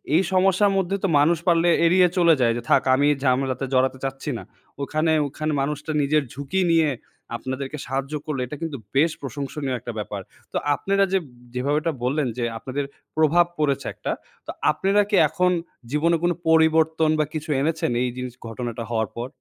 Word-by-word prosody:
এই 180 - +5
সমস্যার 195 +2 +4
মধ্যে 190 +1 0
তো - - +3
মানুষ 165 +3 +4
পারলে 170 0 +4 0.2
এড়িয়ে 180 +1 +5
চলে 170 -2 +6
যায় 115 -2 +3
যে, - - -4
"থাক, - - +5
আমি 145 +2 +3 0.2
ঝামেলাতে 130 0 +1
জড়াতে 130 +1 +2
চাচ্ছি 135 +2 -4
না।" - - -8 0.4
ওখানে 155 +3 0 0.2
ওখানে 155 +2 -3
মানুষটা 150 +2 -3
নিজের 150 +1 +2
ঝুঁকি 140 +8 -2
নিয়ে 160 -2 +4 0.5
আপনাদেরকে 130 +3 -5
সাহায্য 135 +3 -3
করলে। 150 -5 -2
এটা 150 - -6
কিন্তু 160 -4 -3 0.2
বেশ 155 +4 +4
প্রশংসনীয় 140 0 -4
একটা 120 +1 -6
ব্যাপার। 105 -1 -4 0.3
তো - - -1 0.2
আপনারা 195 0 +1
যে 190 - +4 0.3
যেভাবে 140 +4 0
এটা 165 0 -1
বললেন 135 +3 +1
যে 120 - -1
আপনাদের 135 +4 -4 0.3
প্রভাব 160 +3 +5
পড়েছে 140 -3 0
একটা। - - -4 0.4
তো - - -3 0.2
আপনেরা 195 +6 +2
কি 205 - +2
এখন 180 -1 +2 0.4
জীবনে 165 +3 +2
কোন 175 - +3 0.2
পরিবর্তন 160 0 +4
বা 155 - +3
কিছু 155 0 -5
এনেছেন 160 -2 0
এই 125 - 0
জিনিস 125 -1 -5
ঘটনাটা 115 0 -5
হওয়ার 110 -3 0
পর? 120 +1 -3
150 Hz, 175 wpm, -23 LUFS, 130-165 Hz, 0.5 s, চলে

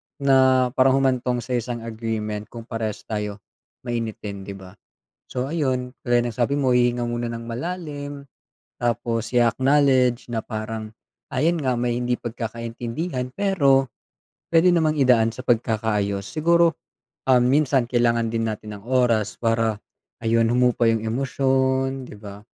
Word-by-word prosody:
na 130 -2 +4
parang 130 0 +4
humantong 125 -2 0
sa 130 - -9
isang 120 0 -5
agreement 110 -2 -4
kung 115 0 -9
parehas 115 -3 -4
tayo 105 -2 -4 0.4
mainitin, 110 -4 -4
di 100 - -6
ba? 95 -1 -12 0.6
So 130 +2 -3
ayun, 130 -5 -1
gaya 120 -1 +3
ng 120 - -3
sabi 125 +3 +1
mo, 135 -2 +1
hihinga 120 0 +2
muna 120 0 -2
nang 115 0 -6
malalim, 145 0 -5 0.6
tapos 115 -1 -1
i-acknowledge 130 +1 +3
na 115 - 0
parang 110 -1 -5 0.4
ayun 160 +6 +2
nga, 130 -2 +1
may 120 -1 0
hindi 125 0 0
pagkakaintindihan, 120 +4 -4
pero 140 -10 +3 0.7
puwede 165 +2 +6
namang 155 -2 +2
idaan 125 -5 +4
sa 130 - -7
pagkakaayos. 105 -4 0
Siguro, 170 +1 +3 0.6
um, 125 -2 +5
minsan 135 -1 +3
kailangan 120 -1 +2
din 115 0 0
natin 105 -1 -6
ang 100 - -21
oras 120 -5 +2
para 115 -2 +1 0.5
ayun, 115 0 +3
humupa 125 -1 +2
yung 115 -1 +1
emosyon, 130 +1 0
di - - -10
ba. 100 -1 -10
120 Hz, 140 wpm, -23 LUFS, 115-130 Hz, 0.7 s, puwede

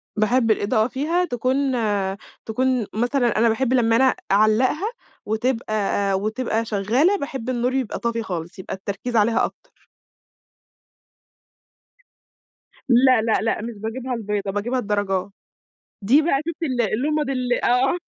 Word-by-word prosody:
باحب 225 +2 +2
الإضاءة 215 +1 +1
فيها 310 +8 0
تكون 260 0 0 0.7
تكون 250 0 0
مثلًا 240 +1 +1
أنا 230 +1 +4
باحب 255 +3 0
لمّا 230 -3 +3
أنا 260 +2 +4 0.2
أعلَّقها 240 - +2 0.3
وتبقى 215 -3 -1
وتبقى 225 +1 -1
شغّالة، 230 - +2
باحب 265 -6 -5
النور 250 0 0
يبقى 260 -5 -2
طافي 235 -1 -2
خالص، 175 -3 -6
يبقى 185 - -6
التركيز 200 +5 -5
عليها 225 +1 +3
أكتر. - - -13 3.0
لأ، 255 -1 +5
لأ، 220 0 +1
لأ 225 -1 -1
مش 235 +1 -5
باجييبها 245 +4 -4
البيضا، 210 -3 -2
باجييبها 230 +6 -1
الدَرَجا 205 -3 -1 0.7
دي 270 +10 +4
بقى 285 -4 +1
شُفتي 335 0 -3
ال 255 -3 -1
اللُمَض 275 +7 0
ال 250 -2 -1
آه. 260 +7 +2
235 Hz, 125 wpm, -22 LUFS, 215-260 Hz, 3.0 s, لأ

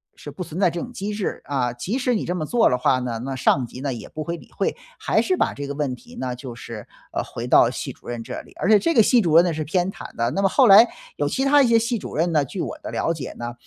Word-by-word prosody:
是 145 - -9
不 165 +6 -6
存 165 +1 -7
在 195 - +4
这 170 - -5
种 245 - -7
机 210 -3 -4
制。 205 -2 -3
啊， 130 -4 -1
即 180 - -3
使 250 -1 +1
你 210 - -2
这 180 - -2
么 160 -4 -2
做 240 +8 +3
了 125 - +1
话 130 +1 +2
呢， 120 -2 -3
那 135 0 -4
上 130 0 +2
级 125 +2 -10
呢， 140 -1 -2
也 120 - -8
不 155 - -5
会 170 +2 -4
理 - - -17
会， - - -1 0.2
还 - - +2
是 370 -1 0
把 - - +1
这 145 0 -6
个 140 - -4
问 140 -3 -2
题 - - -16
呢， 125 -1 -3
就 125 -1 -8
是， 115 -3 -9 0.3
呃， - - -1
回 - - -6
到 - - +6
系 - - -5
主 - - -19
任 120 -1 -4
这 - - -6
里， - - -19
而 190 - 0
且 215 - +8
这 335 +10 +1
个 230 - +6
系 245 +2 +4
主 165 -5 +1
任 170 +2 +7
呢， 175 - 0
是 155 0 -3
偏 180 +5 0
袒 - - -11
的。 115 +1 0
那 195 - -1
么 195 - +3
后 265 +3 +4
来 210 +4 +9 0.3
有 - - 0
其 265 - -1
他 285 +1 +6
一 265 - +4
些 230 -1 +5
系 230 +1 -1
主 - - -8
任 170 +3 +1
呢， 150 -3 +3
据 175 +7 -5
我 - - -4
的 - - -7
了 165 - 0
解 150 -6 -6
呢， 120 0 -6
165 Hz, 335 characters per minute, -23 LUFS, 130-205 Hz, 0.3 s, 来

